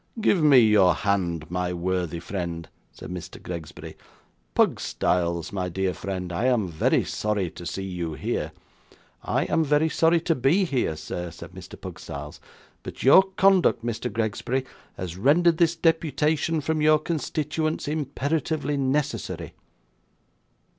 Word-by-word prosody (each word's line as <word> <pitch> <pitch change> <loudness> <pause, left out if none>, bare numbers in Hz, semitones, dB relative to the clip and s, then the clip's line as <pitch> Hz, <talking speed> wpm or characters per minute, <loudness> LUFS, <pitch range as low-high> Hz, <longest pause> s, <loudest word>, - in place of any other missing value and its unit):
'Give 205 -5 +3
me 150 -3 +6
your 105 -6 +5
hand, 85 -6 -1
my 90 0 -1
worthy 90 -1 -2
friend,' 85 -2 -5 0.2
said - - -10
Mr. 90 -2 -7
Gregsbury. 85 -3 -8 0.6
'Pugstyles, 85 -1 0
my 90 -2 -2
dear 95 +1 -1
friend, 90 -1 -5
I 100 +8 -1
am 120 -6 +2
very 80 - +2
sorry 105 -5 -1
to 85 - -8
see 95 - -4
you 90 -4 -4
here.' - - -3 0.7
'I - - 0
am 165 - +1
very 150 +2 +2
sorry 165 +2 +3
to 165 - +1
be 155 +8 +2
here, 130 - -1
sir,' 85 +3 -5
said - - -11
Mr. - - -11
Pugstyles; 75 +1 -8 0.4
'but - - -8
your 140 +8 +8 0.2
conduct, 190 -11 +4
Mr. 120 +1 -3
Gregsbury, 115 +4 -1 0.3
has 90 -1 -5
rendered 160 - +4
this 170 -1 +3
deputation 160 -1 +1
from 155 +1 -1
your 155 0 +5
constituents 155 0 -2
imperatively 150 0 -1
necessary. 120 - -2
115 Hz, 135 wpm, -25 LUFS, -, 0.7 s, your